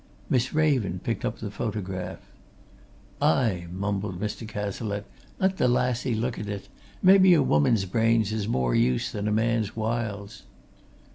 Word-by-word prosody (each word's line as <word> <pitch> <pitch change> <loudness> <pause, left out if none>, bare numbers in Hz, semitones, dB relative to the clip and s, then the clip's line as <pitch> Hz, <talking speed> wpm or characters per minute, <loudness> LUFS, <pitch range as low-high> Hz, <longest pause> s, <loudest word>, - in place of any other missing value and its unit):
Miss 130 0 +2
Raven 135 - +1
picked - - -2
up - - -2
the - - -6
photograph. 95 -2 -4 1.0
"Aye!" 90 -1 +2
mumbled 100 0 -3
Mr. 105 +2 -4
Cazalette. 105 0 -4 0.3
"Let 190 0 +1
the 125 - +3
lassie 125 0 +1
look 115 +2 -2
at 105 - -5
it! 100 -1 -6 0.3
Maybe 190 -1 +7
a 150 - +4
woman's 95 - +3
brains 110 +2 +2
is 110 -2 -2
more 65 - 0
use 65 0 +1
than 105 0 -3
a - - +1
man's 110 -1 0
whiles." 110 -2 -3
110 Hz, 145 wpm, -26 LUFS, 100-120 Hz, 1.0 s, Maybe